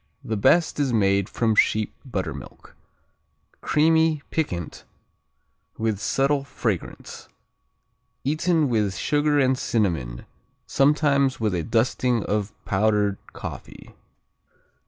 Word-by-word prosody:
The 110 - -3
best 160 +11 +3
is 140 -3 +1
made 100 -3 +2
from 115 -2 +1
sheep 110 0 +2
buttermilk. 95 - -6 0.9
Creamy, 160 -1 +2
piquant, 90 - -3 0.9
with 110 -3 -1
subtle 135 +5 +1
fragrance. 110 -8 -5 1.0
Eaten 155 +2 +1
with 105 -6 0
sugar 145 +6 +1
and 130 -2 +3
cinnamon, 85 - -2 0.4
sometimes 140 -1 +2
with 110 -3 0
a 90 - 0
dusting 120 +4 +1
of 105 0 -2
powdered 105 0 +1
coffee. - - -9
115 Hz, 95 wpm, -24 LUFS, 100-145 Hz, 1.0 s, best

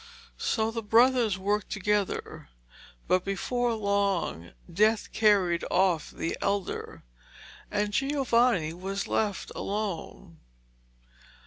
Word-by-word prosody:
So 220 0 0
the 230 0 -3
brothers 230 -1 +3
worked 205 +2 -1
together, 205 - -2 0.6
but 185 0 +2
before 240 +4 -1
long 200 - -1 0.2
death 215 +4 +2
carried 195 -6 +3
off 180 -4 +2
the 165 - -3
elder, 200 -1 -3 0.7
and 205 0 -1
Giovanni 245 - +2
was 195 +3 -4
left 210 -3 -1
alone. 195 -4 -5
205 Hz, 95 wpm, -28 LUFS, 185-220 Hz, 0.7 s, brothers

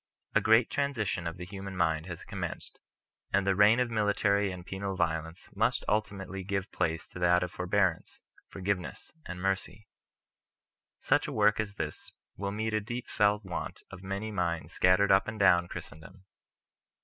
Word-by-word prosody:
A - - +4
great 110 +2 +4
transition 110 -11 -1
of 85 +1 -5
the 90 - -6
human 95 0 -7
mind 80 -1 +1
has 85 -3 -7
commenced - - -6 0.5
and 95 0 +2
the 95 - +3
reign 105 +4 +6
of 125 -2 +1
military 105 -2 +2
and 90 -1 -8
penal 95 0 -4
violence 80 0 -2
must 115 +5 +1
ultimately 95 -3 -2
give 100 0 -2
place 80 0 -1
to - - -9
that 90 0 +4
of 90 - -4
forbearance, 90 -1 0 0.3
forgiveness, 95 -1 -4 0.2
and 90 0 -6
mercy. 95 +2 -2 1.2
Such - - +2
a - - -4
work 105 0 +3
as 105 -2 -2
this - - -5 0.2
will 100 0 -3
meet 110 +2 -2
a 110 - +1
deep 120 +4 -5
felt 105 -1 +2
want 90 -2 -5
of 95 - -9
many 100 +3 -4
minds 85 -4 -2
scattered 95 +2 +4
up 95 0 +5
and 110 0 -4
down 90 -3 +5
Christendom. 90 +6 -10
95 Hz, 165 wpm, -30 LUFS, 90-105 Hz, 1.2 s, reign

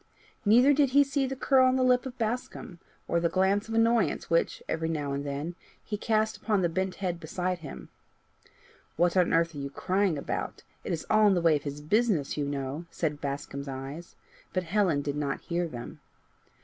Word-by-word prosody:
Neither 245 +7 +6
did 285 -1 +3
he 285 - +8
see 275 -1 0
the 270 - -4
curl 260 0 +4
on 255 - +3
the 260 - +2
lip 250 0 +3
of 260 0 -9
Bascombe, 225 -5 -4 0.3
or 170 - +1
the 170 0 +1
glance 195 +4 +1
of 225 - -3
annoyance 225 -4 +2
which, 165 - +1
every 160 0 -1
now 145 -3 -2
and 140 0 -2
then, 145 +4 -4 0.3
he 210 - -4
cast 215 +1 0
upon 205 -3 0
the 175 - +2
bent 185 +2 -2
head 180 -3 -3
beside 180 +3 -2
him. 65 - -9 1.1
"What 175 +1 +2
on 180 -2 +3
earth 165 0 +2
are 145 - -7
you 140 0 -4
crying 185 +3 0
about? 140 - -4 0.2
It - - -4
is 165 -2 -3
all 215 0 +6
in 195 - +4
the - - +2
way 165 -2 +4
of 145 - -1
his 145 +1 -5
business, 200 - +1
you 145 -1 -2
know," 140 +3 -4
said 150 -4 -3
Bascombe's 140 0 -4
eyes, 135 +5 -7 0.4
but 185 - 0
Helen 180 -5 +1
did 145 0 -2
not 140 -2 -2
hear 175 0 -2
them. 120 -6 -8
175 Hz, 200 wpm, -28 LUFS, 150-215 Hz, 1.1 s, he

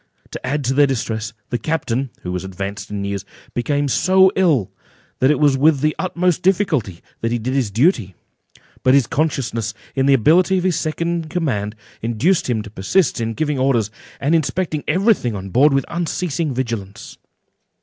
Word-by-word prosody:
To - - -7
add 145 +1 -1
to 130 +1 0
their 145 +1 +5
distress, 110 -4 -2 0.2
the 120 - 0
captain 135 -2 -1
(who 90 - -4
was 90 0 -3
advanced 100 +1 -6
in 100 -1 -4
years) 100 0 -3 0.3
became 145 +4 0
so 190 +7 +4
ill, 155 - +2 0.5
that 130 - +4
it 150 - +2
was 145 -3 +3
with 150 -1 +4
the 155 +1 +1
utmost 180 -2 0
difficulty 170 - +1 0.2
that 115 - -1
he 120 - +1
did 120 +3 -3
his 135 -6 +1
duty; 115 - +1 0.7
but 130 +1 +4
his 140 -4 +4
consciousness 135 -8 -1
of - - -33 0.3
the 140 - +6
inability 175 - +4
of 180 - -1
the 185 - +2
second 165 0 -2 0.2
in - - -12
command, 115 - -2 0.3
induced 125 - +1
him 110 -3 0
to 105 - -11
persist 120 - +1
in 115 0 -2
giving 150 -1 -1
orders, 120 -6 +1 0.3
and 145 +4 +1
inspecting 160 -1 0
every 200 +5 +4
thing 120 - -4
on 95 0 -6
board 140 +7 +5
with 135 -1 +1
unceasing 170 -2 -2
vigilance. 115 -5 -5
135 Hz, 180 wpm, -20 LUFS, 110-160 Hz, 0.7 s, the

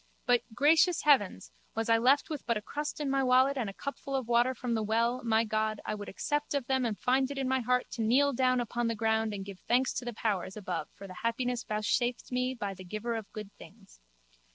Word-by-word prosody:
But, 245 -1 +4
gracious 315 +5 +4
heaven, 270 -10 +4 0.3
was 225 0 -1
I 230 0 +4
left 270 +6 +3
with 300 - -4
but 235 -2 +2
a - - -5
crust 295 +5 -4
in 295 - -2
my 270 0 +1
wallet 260 +2 +4
and 240 -6 -2
a - - -8
cupful 280 +4 -5
of 260 -4 -2
water 240 +2 +3
from 245 -1 -3
the 220 - 0
well, 230 +4 0
my 225 -1 +3
God, 215 -1 -1
I - - -2
would 205 -1 -6
accept 295 +7 -2
of 275 -3 -1
them 265 0 +1
and 220 -3 -2
find 260 +1 +1
it 280 - -6
in 270 -1 -1
my 265 0 +2
heart 250 +1 0
to 235 - -4
kneel 270 +6 +3
down 255 0 +2
upon 240 0 -1
the 230 - -1
ground 220 0 +1
and 195 -2 -5
give 195 -2 -9
thanks 250 +2 +1
to 245 - -4
the 240 - -4
powers 200 -3 -2
above 185 -5 -4
for 200 - -10
the 185 -2 -10
happiness 245 +1 -1
vouchsafed 235 +4 -1
me 250 +1 0
by 205 -5 -4
the 185 0 -11
Giver 215 +6 -4
of 220 -3 -5
good 210 -3 -8
things. - - -16
240 Hz, 240 wpm, -30 LUFS, 215-260 Hz, 0.3 s, But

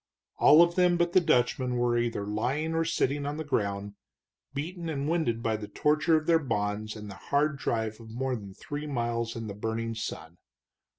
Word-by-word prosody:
All 155 +3 +8
of 170 0 +1
them 180 -1 +3
but 175 0 +1
the 185 - +6
Dutchman 125 -3 +2
were 120 0 +2
either 120 -4 0
lying 130 +10 -1
or 165 0 +2
sitting 140 -1 0
on 145 +1 -3
the 160 - -3
ground, 100 -7 -2 0.6
beaten 165 +4 -4
and 140 -2 -2
winded 155 -9 0
by 110 -1 +1
the 105 -1 -7
torture 155 +5 +2
of 155 - -3
their 165 0 +4
bonds 105 -5 -2
and 105 -1 -8
the 100 - -7 0.2
hard 145 0 +2
drive 110 -4 -2
of 115 -1 -12
more 130 +3 -2
than 100 -4 -9
three 145 +1 -6
miles 115 -3 -2
in 115 -1 -5
the 105 - -5
burning 115 +2 -3
sun. 85 -6 -6
125 Hz, 195 wpm, -28 LUFS, 110-150 Hz, 0.6 s, All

